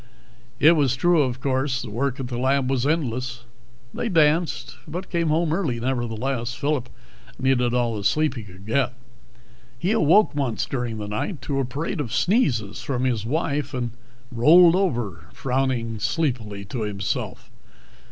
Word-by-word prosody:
It 155 - +7
was 140 -6 +2
true, 175 +3 +3
of 130 -3 -1
course. 130 -1 0
The 115 - -7
work 130 +4 -1
at 130 - -3
the 120 -1 -4
lab 135 0 +1
was 135 0 +1
endless. 130 -5 -1 0.5
They 235 - -2
danced, 160 -1 +2
but 180 +4 -6
came 170 -2 +1
home 155 +1 +1
early 155 -10 -1
nevertheless. 120 0 -2
Phillip 140 -2 -1 0.5
needed 125 -2 +2
all 120 -2 +1
the 105 - -4
sleep 155 +6 +2
he 120 - -6
could 95 -2 -13
get. 130 +3 +1 0.8
He 180 - 0
awoke 210 -1 +4
once 130 -8 -1
during 120 -4 -3
the 105 -1 -5
night 110 - -3
to 140 -2 -1
a 135 - +1
parade 150 +8 -4
of 120 -6 -5
sneezes 125 - +1
from 125 -2 -2
his 115 -4 0
wife, 145 -1 -1
and 120 -2 -2 0.4
rolled 165 +9 +7
over, 120 - -1
frowning 125 -4 -1
sleepily 115 -5 -2
to 115 +4 -5
himself. 100 -2 -3
130 Hz, 160 wpm, -24 LUFS, 120-150 Hz, 0.8 s, It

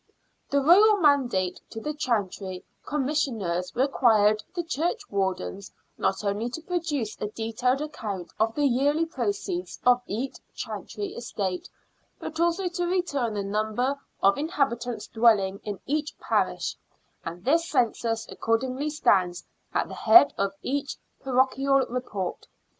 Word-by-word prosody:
The 280 0 +2
Royal 410 +7 +7
mandate 255 - +2
to 225 - -6
the 300 +6 -3
Chantry 200 -9 -2 0.2
Com 290 -2 -1
missioners 215 - -1
required 220 -5 +3
the 345 - -1
churchwardens 200 - -2 0.2
not 195 - -1
only 205 +4 -1
to 290 +7 -6
produce 320 - -2
a - - -1
detailed 230 +5 -1
account 210 - -5
of 225 +1 +1
the 295 - +2
yearly 285 +5 +2
proceeds 205 - -3
of 250 0 +5
each 245 +6 -3 0.2
chantry 410 -1 -5
estate, 195 -6 -4 0.5
but 320 - -6
also 345 +2 +2
to 350 0 -2
return 290 - 0
the 200 - -1
number 215 +6 0 0.3
of 200 +6 +5
inhabitants 255 -6 -1
dwelling 210 -4 +3
in 205 -3 -5
each 300 +2 -2
parish, - - 0 0.5
and 170 +2 -7
this 330 +5 +2
census 230 -3 0
accordingly 255 +6 -1
stands 185 - +2 0.3
at - - 0
the - - -9
head 345 -5 +7
of 200 0 -1
each 280 +1 -2 0.2
parochial 265 +1 +2
report. 210 -7 -4
250 Hz, 130 wpm, -26 LUFS, 205-295 Hz, 0.5 s, Royal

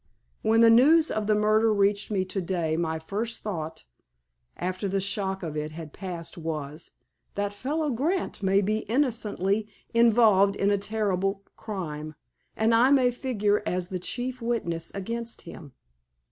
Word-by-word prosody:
When 225 +1 +3
the 230 0 +7
news 305 +8 +6
of 215 -1 -2
the 215 - +3
murder 215 +1 +3
reached 200 0 +1
me 195 -3 0
to 190 +1 -3
day 170 -3 -1
my 160 -1 -1
first 205 +8 -4
thought, 165 - -5 0.7
after 185 +2 -2
the 195 +1 0
shock 195 -1 -1
of 155 -3 -4
it 150 0 -3
had 160 -2 -8
passed, 175 -2 -6
was:—'That 160 +6 -6
fellow, 290 +7 -2
Grant, 305 - -1
may 195 0 +3
be 215 +2 0
innocently 220 -5 0 0.3
involved 220 -4 +5
in 200 0 +1
a 205 - +3
terrible 200 -2 -1
crime, 155 -7 -6 0.4
and 220 +1 +3
I 235 +3 +5
may 260 -3 +4
figure 210 -5 0
as 180 -2 -2
the 185 - -3
chief 250 +6 -4
witness 175 -9 -2
against 230 +4 -4
him. 145 -6 -11
200 Hz, 150 wpm, -27 LUFS, 180-230 Hz, 0.7 s, the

